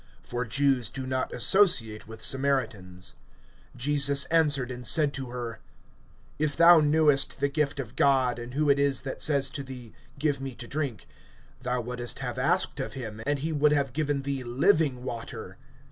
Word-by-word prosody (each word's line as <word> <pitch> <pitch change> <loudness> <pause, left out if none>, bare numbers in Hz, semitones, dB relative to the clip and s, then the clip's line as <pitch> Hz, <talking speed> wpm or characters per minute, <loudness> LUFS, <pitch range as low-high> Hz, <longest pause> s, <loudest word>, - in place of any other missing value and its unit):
For 120 +1 -4
Jews 130 -1 +1
do 130 +1 -6
not 130 0 -2
associate 120 - +2
with 110 0 -9
Samaritans. 110 -10 -1 0.6
(10)Jesus 140 +1 +4
answered 145 -6 +2
and 125 0 -7
said 150 -3 +2
to 135 -3 -5
her: 120 -2 -6 0.8
If 150 -1 -1
thou 170 0 +8
knewest 150 -2 +2
the 140 - +2
gift 145 0 -2
of 125 -2 -6
God, 130 -3 +2
and 120 +2 -8
who 150 +1 +1
it 140 0 +3
is 140 -2 +1
that 135 - -6
says 140 -3 +2
to 145 - -5
thee, 125 -5 -10 0.2
Give 140 -1 -1
me 135 -2 -6
to 120 +1 -8
drink, 140 -8 -4 0.6
thou 125 -1 -2
wouldest 120 0 -6
have - - -5
asked - - +1
of - - -4
him, 110 -4 -7
and 145 0 +1
he 155 +4 -3
would 150 0 +2
have 140 -4 0
given 145 -2 -1
thee 140 -1 -3
living 135 +1 +1
water. 115 -3 -7
135 Hz, 175 wpm, -27 LUFS, 125-145 Hz, 0.8 s, thou